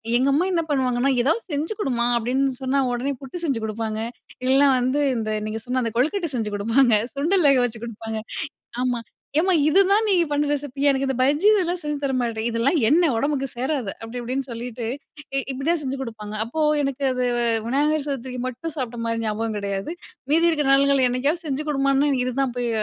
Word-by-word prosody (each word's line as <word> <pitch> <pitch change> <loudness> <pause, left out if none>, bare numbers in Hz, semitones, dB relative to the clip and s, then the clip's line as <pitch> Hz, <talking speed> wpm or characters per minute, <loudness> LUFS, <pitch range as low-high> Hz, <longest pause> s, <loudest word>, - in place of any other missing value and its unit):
எங்க 255 +3 +3
அம்மா 305 +6 +2
என்ன 340 -2 +2
பண்ணுவாங்கன்னா 260 -2 +1
ஏதாவது 320 - +1
செஞ்சு 300 +8 -1
கொடுமா, 245 - 0
அப்டின்னு 260 +3 0
சொன்னா 265 +1 +1
உடனே 245 +3 -1
புட்டு 270 +5 -7
செஞ்சு 275 -8 0
கொடுப்பாங்க. 220 0 -3 0.5
இல்லனா 270 +2 +5
வந்து, 255 +3 +1 0.2
இந்த 220 -2 -2 0.2
நீங்க 215 +1 -3
சொன்ன 255 +1 0
அந்த 230 - -2
கொழுக்கட்டை 330 +7 +1
செஞ்சு 220 -3 -1
கொடுப்பாங்க. 230 +4 +3 0.2
சுண்டல் 330 +5 +2
வேக 275 -2 +5
வச்சு 235 -2 -2
கொடுப்பாங்க. 225 -1 -5 0.6
ஆமா, 250 -1 0 0.4
ஏம்மா 365 +3 +3
இதுதான் 395 +6 +4
நீங்க 360 -4 +4
பண்ணுற 290 0 +1
ரெசிபியா? 285 0 -1
எனக்கு 275 0 0
இந்த 265 - -1
பஜ்ஜி 295 +9 +3
இதெல்லாம் 360 -3 0
செஞ்சு 295 -1 -2
தர 270 - 0
மாட்ட? 230 -2 -2
இதெல்லாம் 235 +8 +1
எண்ண 330 +7 +4
ஒடம்புக்கு 275 +2 0
சேராது. 255 -4 -1
அப்டி 230 +2 -6
இப்டின்னு 255 +2 -3
சொல்லிட்டு 235 0 -5 0.5
இ - - +3
இப்டிதான் 300 +6 0
செஞ்சு 270 -1 -3
கொடுப்பாங்க. 215 -4 -7
அப்போ 240 +8 -4 0.2
எனக்கு 275 0 -2
அது 250 0 -1 0.4
விநாயகர் 295 +4 +1
சதூர்ரிக்கு 255 -2 -4
மட்டும் 300 +6 -6
சாப்பிட்ட 245 -4 -4
மாதிரி 230 0 -1
ஞாபகம் 220 0 -2
கிடையாது. 200 +4 -3 0.4
மீதி 330 +3 +4
இருக்கிற 300 -4 0
நாள்கள் 275 -1 +4
என்னைக்காவது 280 +8 0
செஞ்சு 290 +1 -2
கொடுமான்னு 275 0 +2
இதுதான் 255 0 -1
போய் 245 -1 0
265 Hz, 180 wpm, -23 LUFS, 240-295 Hz, 0.6 s, இல்லனா